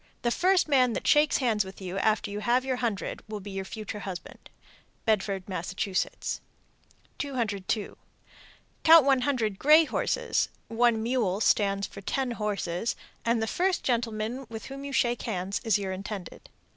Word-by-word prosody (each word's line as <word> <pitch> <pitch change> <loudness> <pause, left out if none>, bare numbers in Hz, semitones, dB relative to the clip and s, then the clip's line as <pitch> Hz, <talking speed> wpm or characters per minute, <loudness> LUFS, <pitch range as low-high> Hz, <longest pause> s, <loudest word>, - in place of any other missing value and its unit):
The 240 - +2
first 370 +6 +3
man 255 -5 +4
that - - -4
shakes 295 0 +4
hands 225 -6 +1
with 190 0 -11
you 190 0 -4
after 215 0 +1
you 205 - -3
have 240 +4 +2
your 260 -1 -1
hundred 230 -5 -2
will 215 -1 -5
be 200 0 -8
your 195 0 -3
future 210 +1 -6
husband. 190 -3 -8 0.6
Bedford, 195 -3 0
Mass. 185 -1 -4
202. 210 +2 -4 0.9
Count 320 -3 +8
one 270 -2 +4
hundred 235 -7 0
gray 310 +3 +7
horses - - 0 0.2
(one 230 -1 +2
mule 225 -6 0
stands 200 -2 +2
for 200 - -10
ten 260 +5 -1
horses), 210 -2 -2 0.3
and 230 -1 +1
the - - +1
first 365 - 0
gentleman 235 +1 -1
with 225 -1 -7
whom 275 +1 -7
you 280 - -5
shake 240 -3 +1
hands 185 +2 -2
is 220 -3 +3
your 195 -2 -3
intended. 195 0 -7
220 Hz, 160 wpm, -28 LUFS, 200-255 Hz, 0.9 s, Count